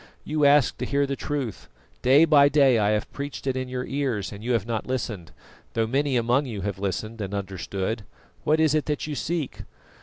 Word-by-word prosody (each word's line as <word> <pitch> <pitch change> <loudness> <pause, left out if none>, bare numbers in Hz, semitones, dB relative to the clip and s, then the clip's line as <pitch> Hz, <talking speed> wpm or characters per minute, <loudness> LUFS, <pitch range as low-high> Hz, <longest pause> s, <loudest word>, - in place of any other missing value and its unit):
You 150 -1 +1
ask 140 -4 +4
to - - -2
hear 140 0 +2
the 140 0 -2
truth; 135 - -4 0.3
day 140 +6 +6
by 145 -3 +6
day 135 -4 +4
I 105 -1 +2
have 105 0 -1
preached 140 0 -6
it 135 -1 0
in 130 -1 -3
your 125 0 -3
ears 130 -8 -2
and 100 +1 -9
you 125 +1 0
have 110 -4 +1
not 115 -2 -3
listened, 110 -10 -3 0.4
though 115 -1 +1
many 135 +3 +1
among 125 +4 +2
you 105 -5 -5
have 100 0 -3
listened 110 +3 -3
and 100 0 -4
understood. 100 +2 -3 0.4
What 155 +1 +2
is 155 -2 +4
it 155 -1 +1
that 150 -2 -2
you 155 - -4
seek?" 160 0 -3
125 Hz, 210 wpm, -25 LUFS, 105-145 Hz, 0.4 s, day